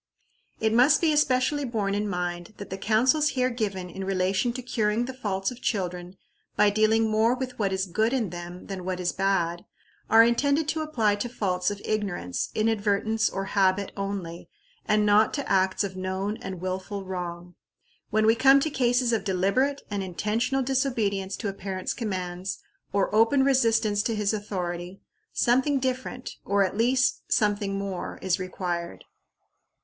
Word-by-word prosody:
It 220 0 +1
must 250 +6 +5
be 320 -3 +2
especially 290 0 +2
borne 215 -6 -1
in 205 +1 -1
mind 175 +1 -4
that 200 - -9
the 190 - -3
counsels 255 +9 +3
here 255 0 +2
given 200 -6 -3
in 190 +2 -7
relation 190 +4 0
to 255 0 -6
curing 225 -1 0
the 260 - -6
faults 195 -5 -2
of 250 - -11
children 180 -2 -3 0.4
by 210 0 +4
dealing 220 +2 +3
more 220 +3 +2
with 255 -1 -6
what 200 -3 +1
is 190 0 0
good 220 +5 0
in 235 -9 -1
them 175 +1 -8
than 190 -2 -6
what 185 0 -3
is 180 -1 0
bad, 175 -3 0 0.5
are 225 +1 +8
intended 280 +6 +2
to 320 - -1
apply 225 -10 +1
to 240 +4 -3
faults 185 -6 -1
of 205 -1 -5
ignorance, 195 - -2
inadvertence, 220 0 +1
or 195 0 -4
habit 195 0 +2
only, 195 -4 -5 0.4
and 210 0 +3
not 210 +1 +4
to 285 - -3
acts 190 0 +2
of 190 -2 -4
known 190 +2 -2
and 185 -2 -7
willful 190 +2 -4
wrong. 175 -1 -6 0.6
When 215 0 +2
we 220 - +6
come 270 +4 +6
to 315 - -1
cases 245 -2 +2
of 220 -3 0
deliberate 205 +9 +1
and 200 -1 -1
intentional 220 +8 -1
disobedience 230 -8 -1
to 220 - -4
a 195 - -2
parent's 190 -1 -4
commands, 185 -4 -4 0.3
or 200 0 0
open 225 +5 +4
resistance 225 -6 +3
to 225 +1 -1
his 210 0 0
authority, 180 -3 -4 0.3
something 260 +4 +2
different, 255 -1 -3
or 200 0 +2
at 185 - -4
least 255 +4 +2
something 205 -2 +1
more, 195 -2 -4
is 190 +1 +1
required. 175 -2 -4
205 Hz, 165 wpm, -26 LUFS, 190-240 Hz, 0.6 s, are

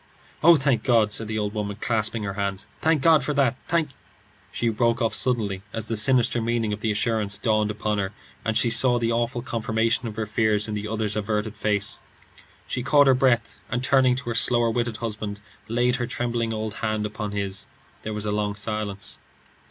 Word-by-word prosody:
"Oh, 170 +1 +8
thank 135 -6 +1
God!" 110 -4 +3
said 110 - +1
the 110 0 -3
old 105 -1 -2
woman, 105 -2 -3
clasping 110 -1 0
her 100 -1 -3
hands. 100 -1 -3 0.2
"Thank 155 -3 +2
God 160 -2 +5
for 150 - -2
that! 135 -4 +2
Thank 165 -3 +1 0.3
" - - -32
She 120 - -1
broke 115 +1 +1
off 115 -3 0
suddenly 105 -7 0
as 110 -1 -3
the 115 - 0
sinister 120 +1 +3
meaning 115 -2 0
of 105 - -5
the 110 - -1
assurance 105 -1 0
dawned 110 0 +1
upon 105 0 -2
her 95 -1 -2 0.3
and 110 0 +1
she 115 0 +3
saw 125 0 +5
the 115 -1 0
awful 120 +1 -1
confirmation 115 0 0
of 110 - -6
her 110 0 -2
fears 105 0 +1
in 105 - -4
the 105 0 -3
other's 110 -1 -2
averted 105 +1 -2
face. 105 -1 -1 0.6
She 125 - -3
caught 145 +3 +5
her 135 - +6
breath, 125 -4 +1
and 125 +1 -2
turning 130 -2 +4
to 125 -2 -5
her - - -1
slower 120 0 +3
witted 120 -1 -1
husband, 105 -3 -4 0.3
laid 120 +2 +1
her 120 -2 -2
trembling 120 -2 -2
old 110 -1 -3
hand 110 -1 -1
upon 105 0 -4
his. 100 -1 -3 0.3
There 110 - -5
was 105 0 -3
a 105 - -1
long 105 0 -1
silence. 105 -1 -4
110 Hz, 205 wpm, -24 LUFS, 105-120 Hz, 0.6 s, Oh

